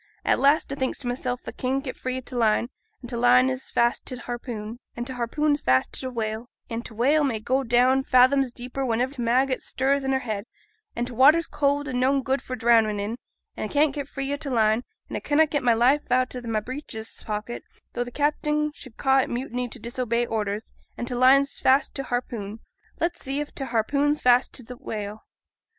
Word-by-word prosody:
At - - +3
last 280 +1 +3
a - - -2
thinks 260 -2 -1
to 250 - -6
mysel' 245 0 -2
a - - -5
can't 265 +2 -1
get 260 - -5
free 255 0 -3
o' - - -4
t' 255 0 -9
line, 230 0 +2 0.3
and 245 - -9
t' - - -3
line 250 +2 +5
is 260 0 -4
fast 235 0 +1
to 255 - -3
t' 245 - -10
harpoon, 235 -2 -6 0.2
and 240 - -3
t' 260 - -6
harpoon 255 +5 0
is 290 - +1
fast 130 0 +2
to - - -2
t' 260 - -4
whale; 225 -1 -4 0.2
and 230 +1 -3
t' 225 - -11
whale 285 +7 +3
may 245 -6 0
go 260 +5 0
down 250 +2 +3
fathoms 260 +1 +4
deep 245 +1 -10
wheniver 255 0 0
t' 260 - -6
maggot 255 +3 +2
stirs 275 +1 0
i' 265 - -1
her 265 - +3
head; 210 -2 -3 0.5
an' 240 - -1
t' 245 - -8
watter's 295 +7 +6
cold, 290 -1 0
an 250 -3 -2
noane 270 +1 +2
good 270 +1 0
for 255 - -5
drownin' 225 -3 +3
in; 205 +3 -3 0.4
a - - -3
can't 295 -1 +2
get 285 -1 -4
free 275 0 -3
o' - - -2
t' 285 -1 -5
line, 220 -1 +2 0.2
and - - -4
a - - -6
connot 305 +1 +3
get 290 - +1
my 240 -2 +3
knife 255 +5 +2
out 255 0 +2
o' 250 - -4
my 220 -1 +1
breeches 225 -1 -6
pocket 215 +2 -4 0.3
though 245 - -1
t' 245 - -8
captain 300 +2 0
should 255 -6 -13
ca' 270 -1 +3
it 265 - 0
mutiny 245 0 -3
to - - -8
disobey 240 -1 -1
orders, 215 -1 -3 0.2
and 240 - -4
t' 250 - -2
line's 265 +3 +4
fast 265 +2 +3
to 275 - -3
t' 270 - -9
harpoon 230 -4 -4 0.4
let's 345 +1 -1
see 270 +2 -2
if 295 - -5
t' 270 - -4
harpoon's 280 +5 +1
fast 250 +1 +4
to 250 - -6
t' 250 - -8
whale. 215 -3 -6
255 Hz, 230 wpm, -25 LUFS, 235-275 Hz, 0.5 s, watter's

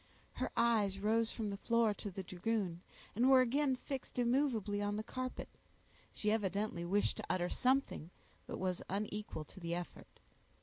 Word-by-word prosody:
Her - - -2
eyes 215 -5 +3
rose 220 +3 +2
from 215 -3 -3
the 200 - -4
floor 230 0 +3
to 205 - -6
the 190 0 -5
dragoon, 185 -1 -1 0.3
and 245 +4 +4
were 265 -1 +8
again 265 +2 +2
fixed 265 0 -6
immovably 240 -5 +2
on 205 0 0
the 215 - -2
carpet—she 255 -3 -6
evidently 200 -4 0
wished 200 +4 +1
to - - -5
utter 175 -1 +1
something 260 - +1 0.4
but - - -4
was 185 -1 -1
unequal 205 -4 -3
to - - -13
the 170 -1 -2
effort. 175 0 -8
210 Hz, 160 wpm, -36 LUFS, 190-235 Hz, 0.4 s, were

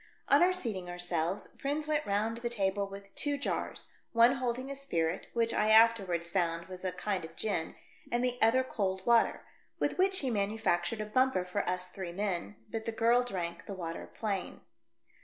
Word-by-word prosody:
On - - +6
our 360 +1 +6
seating 220 - -3
ourselves, 175 +2 -2
Prins 295 +2 -1
went 300 -1 0
round 215 +3 0
the 235 0 -3
table 200 -3 0
with 195 0 -10
two 290 -1 0
jars 280 - -3
— - - -44
one 235 +3 +6
holding 255 +1 -2
a - - -4
spirit, 175 -11 -1
which 230 -1 +2
I 215 - +2
afterwards 200 -7 +4
found 170 -3 0
was 185 0 -9
a 185 - -1
kind 185 0 -2
of 160 - -9
gin, 195 -7 -2 0.4
and 240 +1 +1
the 245 0 -1
other 235 +4 +5
cold 190 -6 -2
water, 235 -1 +3 0.3
with - - -1
which 380 0 +4
he 265 -3 0
manufactured 205 -1 0
a - - -2
bumper 255 -4 +2
for 180 +3 -1
us 180 0 -2
three 185 -3 -6
men, 180 - -2 0.2
but 220 -1 -4
the 230 - -1
girl 230 +2 +4
drank 170 -7 -4
the 200 - -5
water 165 -2 -5
plain. 200 -4 -4
210 Hz, 190 wpm, -31 LUFS, 180-240 Hz, 0.4 s, On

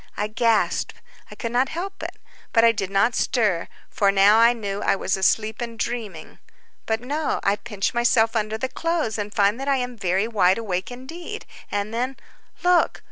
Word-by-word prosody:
I 210 - 0
gasped—I 225 0 -1
could 230 - -4
not 250 +2 +2
help 380 +4 -5
it—but 230 - -3
I 230 - +7
did 200 -4 -3
not 200 +5 +2
stir. 210 -11 +1 0.2
For 200 -1 +2
now 200 +3 +5
I 230 +1 +7
knew 205 -4 -4
I - - +2
was 190 - -1
asleep 215 +4 +1
and 235 -1 -5
dreaming. 220 -8 -5 0.5
But 225 0 0
no, 290 +5 -1
I 200 +1 +2
pinch 205 -2 -3
myself 235 -1 +3
under 215 0 -1
the 260 - -2
clothes, 305 -5 -2
and 205 0 -4
find 205 +3 +2
that 270 - -5
I 275 -1 +3
am 250 -1 -3
very 195 0 0
wide 195 -5 +3
awake 190 -5 -3
indeed; 265 +8 -8 0.3
and 205 +2 -2
then—look! 270 +8 -1
225 Hz, 175 wpm, -23 LUFS, 200-245 Hz, 0.5 s, I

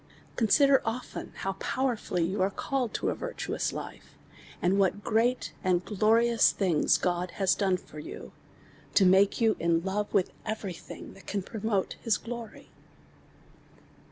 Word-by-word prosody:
Consider 270 +5 +4
often 235 +3 -5
how 195 - -3
poweifaily 235 -10 -1
you 190 +2 -2
are 190 - +3
called 250 +3 -2
to - - 0
a - - -1
virtuous - - -3
life, - - -9 0.4
and 185 +3 +2
what 195 +1 +1
great 235 +3 +1
and 180 -2 +1
gioiious 225 +3 +4
things 180 -6 +2
God 180 0 -1
has 195 -2 +3
doiie 190 -3 +1
for 150 - -12
you, - - -8 0.6
to 195 - +6
make 190 +2 +4
you 225 -2 +3
in 165 0 +1
love 205 +2 -2
with 195 -3 +2
every 210 -4 -4
thing 170 - -10
that - - -17
can 200 -2 -2
promote 215 -2 -2
ins 225 -2 +2
glory. 235 -1 -8
205 Hz, 150 wpm, -28 LUFS, 185-230 Hz, 0.6 s, to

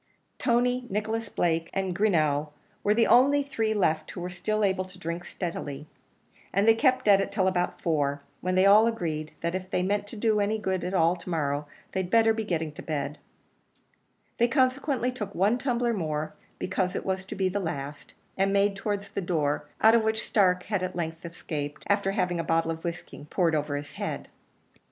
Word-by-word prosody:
Tony, 245 0 +1
Nicholas 215 +2 -2
Blake, 165 -3 0
and 190 -2 -1
Greenough 155 -7 +2 0.4
were 210 +1 +3
the 230 0 +4
only 280 +3 +5
three 225 -6 -1
left 160 -7 +1
who 175 - -7
were 180 +1 -4
still 215 +4 -1
able 190 -2 +2
to 185 0 -13
drink 170 0 -4
steadily, 150 -6 -5 0.7
and 200 +3 +2
they 225 - +8
kept 255 0 +2
at 200 -1 +7
it 195 - -3
till 200 -2 +1
about 180 -1 0
four, 145 -3 0 0.2
when 185 +1 -1
they 185 +1 +5
all 210 +3 +7
agreed, 160 -9 -3
that 170 +1 -1
if 185 0 -4
they 180 - 0
meant 205 +2 0
to 215 - -9
do 215 0 +2
any 205 +2 +1
good 190 -3 -2
at 185 - -2
all 170 0 +4
to 175 - -10
morrow, 145 -3 -1 0.2
they'd 190 -2 -2
better 225 0 +5
be 220 0 -2
getting 165 -6 -2
to 150 - -10
bed; 145 -1 -3 1.2
they 235 - +5
consequently 260 0 +1
took 210 -5 -6
one 205 +7 +2
tumbler 245 -3 0
more, 155 -6 -2 0.2
because 185 -1 -1
it - - -3
was 190 0 -1
to 190 - -7
be 190 -1 +1
the 195 +2 -1
last, 145 -5 -5 0.2
and 195 +1 +2
made 200 0 +3
towards 200 0 -3
the 200 - -2
door, 150 -5 -1
out 220 +1 +7
of 230 - +5
which 220 0 0
Stark 180 -4 +3
had 205 -3 -1
at 185 -1 -3
length 165 -1 -4
escaped, 150 -4 -5
after 200 -1 +1
having 180 -4 0
a - - 0
bottle 165 0 +1
of 165 0 -6
whiskey 170 -3 -6
poured 170 -4 +2
over 150 -1 0
his 145 0 -7
head. - - -5
190 Hz, 200 wpm, -27 LUFS, 165-215 Hz, 1.2 s, they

